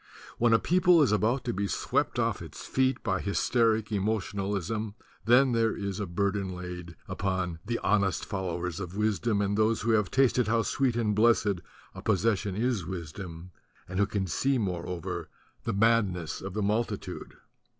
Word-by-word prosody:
When 120 0 +4
a 115 - +7
people 180 +2 +4
is 135 - +2
about 110 +5 +1
to 120 - -2
be 100 +1 -1
swept - - 0
off - - 0
its - - -9
feet 130 0 +1
by 95 -1 0
hysteric 110 +1 +1
emotionalism 100 0 -2 0.3
then 125 +3 +5
there 115 -1 +1
is 100 -1 -3
a 100 - -2
burden 95 +1 -1
laid 90 -1 -7
upon 95 -3 -2
"the 115 +2 -2
honest 100 -3 +2
followers 90 -3 -3
of 90 0 -6
wisdom 105 0 +1
and 100 0 0
those 110 +1 +2
who 115 - +1
have 105 -4 +2
tasted 125 -3 +3
how 115 0 +2
sweet 130 +1 0
and 110 -3 +1
blessed 105 -4 +3 0.3
a - - -9
possession 105 -2 +1
is 115 -2 0
wisdom, 85 0 -7 0.4
and 90 +2 -3
who 100 - +3
can 100 -2 -1
see 130 - +1
moreover 90 -5 -3 0.4
the - - -1
madness 100 -7 +1
of 95 0 -6
the 105 - 0
multitude." 110 +4 -2
105 Hz, 165 wpm, -28 LUFS, 95-115 Hz, 0.4 s, a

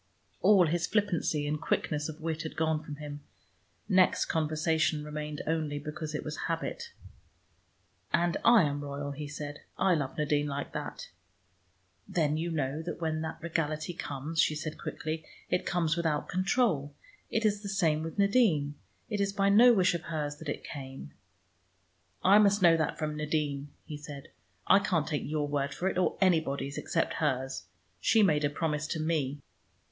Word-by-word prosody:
All 200 -4 +6
his 170 +2 0
flippancy 180 -8 +1
and 150 +1 -2
quickness 150 -1 -1
of 155 +1 -8
wit 160 0 -2
had 160 - -6
gone 160 -1 +1
from 150 -1 -7
him. 145 0 -7 0.7
Next 185 -3 +4
conversation 160 -1 +1
remained 150 0 -5
only 155 -2 -1
because 150 +1 -5
it - - -3
was 150 0 -5
a - - -3
habit. 470 - -3 1.2
"And 175 0 +2
I 235 -5 +7
am 145 -1 -1
royal," 145 0 -4
he 145 +1 -6
said. 145 0 -6 0.2
"I 190 - +3
love 145 -5 -2
Nadine 150 -1 +1
like 140 0 -4
that." - - -5 1.0
"Then 155 -3 +1
you 165 +2 -1
know 150 -2 -1
that 170 +1 -5
when 160 -2 -1
that 160 +1 -5
regality 155 0 -1
comes," 150 +1 -2
she 155 - +2
said 155 0 -5
quickly, 160 0 -4 0.3
"it 180 - 0
comes 165 -3 +1
without 160 -3 0
control. 185 - +1 0.3
It 225 0 0
is 205 -1 +2
the 200 - -5
same 165 -6 +2
with 165 +3 -6
Nadine; 200 - +3 0.3
it 210 -2 -1
is 200 0 +1
by 195 0 +2
no 235 +5 +8
wish 185 -6 +4
of 170 - -4
hers 150 -3 -3
that 160 -1 -7
it - - -4
came." 135 - -8 1.1
"I 200 +3 +7
must 205 -1 +4
know 170 -1 +7
that 155 -2 -1
from 155 -1 -2
Nadine," 150 -2 -1 0.2
he 150 - -6
said. 145 -2 -9 0.4
"I - - +6
can't 180 -7 0
take 150 - -2
your 150 0 -1
word 140 -1 -1
for 185 - -1
it, 190 - 0
or 185 - +1
anybody's 145 -7 +1
except 165 - 0
hers. 130 -8 -1 0.3
She 220 -2 +4
made 155 -6 +3
a 145 - +3
promise 150 0 -1
to 160 - -3
me." 155 -3 0
155 Hz, 175 wpm, -30 LUFS, 145-175 Hz, 1.2 s, no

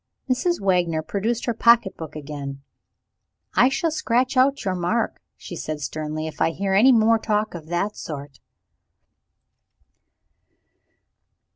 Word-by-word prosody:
Mrs. 345 +7 +1
Wagner 175 -5 +1
produced 220 +7 -2
her 235 - 0
pocket 235 -3 +4
book 155 -2 -8
again. 140 -2 -7 0.9
"I 250 - +5
shall 325 +4 0
scratch 255 -3 0
out 275 +1 +3
your 190 - 0
mark," 185 +6 -1 0.2
she 175 - -8
said 155 -2 -4
sternly, 155 +1 -4
"if 160 - -7
I - - +4
hear 195 +3 -2
any 225 +7 +6
more 225 -1 +4
talk 215 0 -1
of 165 -3 -8
that 175 +5 -1
sort." 140 -4 -8
195 Hz, 130 wpm, -23 LUFS, 155-235 Hz, 0.9 s, any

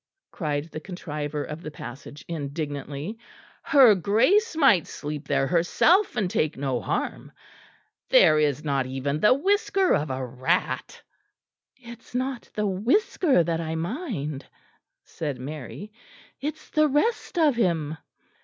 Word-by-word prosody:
cried 150 -4 -2
the - - -5
contriver 150 -4 -5
of 150 +2 -7
the 155 - -6
passage 140 0 -10
indignantly, 145 +4 -5 0.4
"her 265 -7 +6
Grace 260 - +2
might 240 - +4
sleep 150 0 -6
there 140 -1 +1
herself 325 - +3
and 205 - +1
take 155 -2 0
no 135 -3 -1
harm. - - -3 0.8
There - - +6
is 150 -1 +1
not 140 -3 0
even 135 +3 -2
the 210 +8 +5
whisker 390 +4 +2
of 150 0 0
a 130 0 -3
rat." 130 +8 -2 0.7
"It 235 -2 -12
is 240 - -17
not 255 -1 -3
the 210 - 0
whisker 235 - +2
that 165 0 -1
I 160 0 -3
mind," 165 - -4 0.6
said 145 -5 -5
Mary, 150 - -8 0.5
"it 300 +4 -3
is 310 - -20
the 305 -1 +4
rest 325 - 0
of 305 -6 +4
him." 165 -8 0
170 Hz, 135 wpm, -25 LUFS, -, 0.8 s, her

